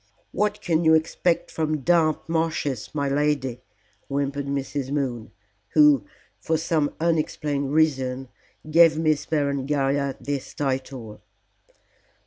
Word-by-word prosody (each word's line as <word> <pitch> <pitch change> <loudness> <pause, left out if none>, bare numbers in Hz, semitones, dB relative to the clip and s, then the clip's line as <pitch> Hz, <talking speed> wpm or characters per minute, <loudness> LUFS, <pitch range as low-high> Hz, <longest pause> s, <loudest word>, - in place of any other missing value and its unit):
"What 210 +1 -1
can 165 -1 +1
you 160 0 +6
expect 165 +2 0
from 155 -2 -1
damp 160 +1 +2
marshes, 160 -7 -1
my 140 -1 0
lady?" 140 -3 0 0.5
whimpered 140 0 -2
Mrs. 140 -1 -3
Moon, 130 -6 -2 0.5
who, 150 -7 +6 0.3
for 160 +9 0
some 155 -2 0
unexplained 150 -4 -1
reason, 135 -4 +1 0.4
gave 165 0 +5
Miss 155 -2 +1
Berengaria 140 -2 0
this 140 -2 -5
title. 130 -5 -4
145 Hz, 110 wpm, -24 LUFS, 135-160 Hz, 0.5 s, you